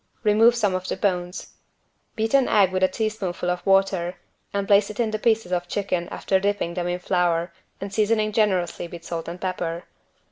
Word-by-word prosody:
Remove 225 +2 +5
some 210 -5 +1
of 185 0 -3
the - - -2
bones. 180 -1 -2 0.6
Beat 225 +2 -1
an 275 -2 +5
egg 195 -3 +4
with 185 0 -1
a 185 - +5
teaspoonful 195 -5 -2
of 180 - -4
water 195 -2 +2 0.4
and 200 -1 -1
place 200 0 +4
in 220 +2 -1
it - - -5
the 215 - -2
pieces 220 -4 +1
of 175 -1 -1
chicken 180 -3 -2
after 190 - 0
dipping 200 -3 -1
them 175 0 -2
in 175 0 -1
flour 175 -2 0 0.3
and 195 0 -6
seasoning 215 0 +1
generously 190 -5 0
with 170 0 -10
salt 165 -1 -5
and 170 +2 -6
pepper. 175 -2 -3
190 Hz, 190 wpm, -24 LUFS, 175-210 Hz, 0.6 s, Remove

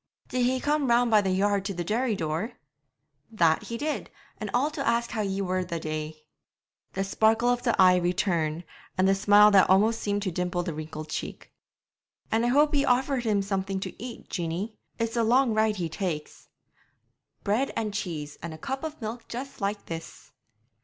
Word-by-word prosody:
'Did 250 -1 0
he 260 0 +1
come 295 0 +1
round 240 0 +3
by 215 -1 +6
the 195 - -1
yard 200 +1 +1
to 195 -1 -4
the 175 - -2
dairy 225 +5 0
door?' 165 +7 -2 0.8
'That 170 -8 +3
he 230 - -4
did; 300 +4 -3 0.3
and 215 - -4
all 270 +7 +1
to 300 -2 -5
ask 235 0 +1
how 220 - -1
ye 195 -1 -1
were 185 0 0
the 170 -2 -4
day.' 155 0 -5 0.7
The 195 - -1
sparkle 220 +4 +2
of 245 0 +1
the 240 -2 0
eye 185 -1 +7
returned, 175 -2 0 0.3
and 185 +1 +3
the 195 - +5
smile 205 +2 +6
that 195 -2 +6
almost 215 +4 +4
seemed 205 0 -1
to 190 - -1
dimple 180 0 -1
the 170 -2 -3
wrinkled 155 0 -7
cheek. - - -6 0.8
'And 225 +1 +2
I - - +2
hope 295 +4 +4
ye 280 -1 +3
offered 260 -1 +1
him 205 -3 +2
something 195 -1 -2
to 195 - -7
eat, 245 -2 -8
Jeanie; 180 +5 -3 0.2
it's 230 +1 -2
a 235 - +2
long 245 +1 +3
ride 220 0 +2
he 175 -4 -2
takes.' 165 -3 -5 0.9
'Bread 220 +7 +1
and 215 -2 -2
cheese, 160 -8 -4
and 165 -1 -6
a - - -11
cup 270 - -4
of 310 -1 -5
milk 225 +2 -6
just 255 +1 -7
like 200 +1 -2
this.' 165 0 -8
205 Hz, 195 wpm, -27 LUFS, 180-235 Hz, 0.9 s, eye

